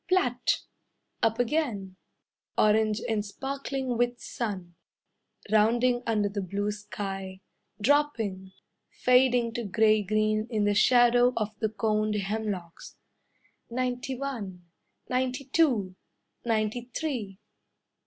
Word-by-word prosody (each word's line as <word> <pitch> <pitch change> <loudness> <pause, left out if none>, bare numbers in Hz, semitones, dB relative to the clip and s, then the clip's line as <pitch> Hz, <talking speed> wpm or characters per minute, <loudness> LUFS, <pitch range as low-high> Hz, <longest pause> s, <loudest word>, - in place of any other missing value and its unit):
Plat! 250 -10 +2 0.6
Up 225 0 +2
again, 235 -8 -1 0.6
Orange 215 0 +3
and 220 -2 0
sparkling 270 +3 -4
with 245 0 +1
sun, 190 -7 -5 0.8
Rounding 240 +3 +3
under 215 -3 +2
the 200 0 -3
blue 200 +3 -2
sky, 195 -2 -6 0.4
Dropping, 220 -7 +1 0.4
Fading 250 -2 +3
to 235 - -3
grey 215 +1 +3
green 215 +2 +1
In 215 -4 0
the 205 0 +3
shadow 245 +3 +5
of 215 -2 0
the 220 - 0
coned 215 0 0
hemlocks. 200 -4 -4 0.7
"Ninety 250 +2 -2
one." 210 -10 -5 0.4
"Ninety 255 +2 -1
two." 250 - +2 0.5
"Ninety 225 +1 -1
three." 235 -12 -3
220 Hz, 105 wpm, -28 LUFS, 205-250 Hz, 0.8 s, shadow